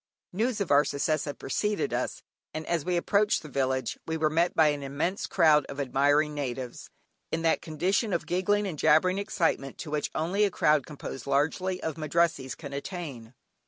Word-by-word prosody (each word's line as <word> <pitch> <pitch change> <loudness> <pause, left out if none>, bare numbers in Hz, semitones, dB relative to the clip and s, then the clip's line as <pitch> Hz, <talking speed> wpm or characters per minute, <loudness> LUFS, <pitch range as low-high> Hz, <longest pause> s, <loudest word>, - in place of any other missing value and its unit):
News 225 +4 0
of 200 - -2
our 145 +1 +6
success 150 +2 -1
had 145 -2 -5
preceded 210 - -1
us, - - -2 0.3
and 155 0 -4
as 170 -4 -1
we 180 +1 0
approached 200 +3 +2
the - - -8
village 130 -2 -1
we 160 0 -1
were 155 -1 +1
met 170 +3 +1
by 160 -2 +5
an 145 -1 -2
immense 140 +8 -2
crowd 155 -4 +4
of 140 - -7
admiring 145 +3 +2
natives, 130 -4 -5 0.4
in 165 0 -1
that 165 - +2
condition 185 +8 0
of 170 - -1
giggling 205 +4 +1
and 170 -7 -5
jabbering 185 +5 +4
excitement 165 -9 -1
to 155 - -7
which 150 -1 -1
only 180 +6 +1
a 205 - +4
crowd 150 -6 +2
composed 135 -3 -7
largely 160 +7 0
of 160 -1 -3
Madrassees 155 -4 0
can 140 -3 -9
attain. 140 - -6
155 Hz, 185 wpm, -28 LUFS, 140-180 Hz, 0.4 s, our